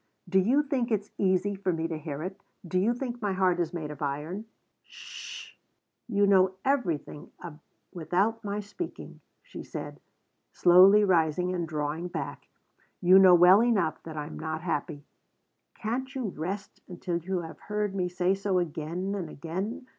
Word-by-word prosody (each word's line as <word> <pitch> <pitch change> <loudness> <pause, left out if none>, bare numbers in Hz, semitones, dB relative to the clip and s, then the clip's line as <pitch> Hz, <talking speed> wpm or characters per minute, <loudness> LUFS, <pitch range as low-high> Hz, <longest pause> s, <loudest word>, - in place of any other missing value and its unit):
"Do 190 - +3
you 255 +10 +3
think 265 -4 -1
it's 210 -2 -1
easy 190 +1 +2
for 190 -1 -1
me 165 -1 -1
to 165 - -4
hear 155 -1 -5
it? 190 +2 -6 0.3
Do 185 +2 +1
you 210 +5 +2
think 245 -1 -5
my 205 -2 0
heart 185 -2 +2
is 170 -2 0
made 160 -4 -5
of 150 - -10
iron?" 150 +9 -3 0.4
"'S - - -34
sh! - - -9 0.5
You 205 -3 +2
know 190 -1 +4
everything 175 - -1 0.6
without 195 +7 0
my 205 0 -3
speaking," 210 - -8 0.2
she - - -9
said, - - -7 0.5
slowly 185 +4 +7
rising 180 -1 +2
and 170 -2 -2
drawing 155 +2 -3
back. 175 - -6 0.5
"You 185 +1 +7
know 185 -2 +8
well 180 +4 +7
enough 225 -9 +1
that 160 -1 -9
I 150 - -3
am 150 - -8
not 160 0 -4
happy. 150 -3 -3 0.7
Can't 260 +5 -4
you 250 -6 -2
rest 190 +4 -6
until 175 -1 -3
you 180 +2 -3
have 165 -1 -9
heard 210 -1 -2
me 180 -2 -1
say 180 +1 +1
so 195 -1 0
again 175 +3 -2
and 185 -5 -4
again? 190 - -5
185 Hz, 170 wpm, -28 LUFS, 165-205 Hz, 0.7 s, know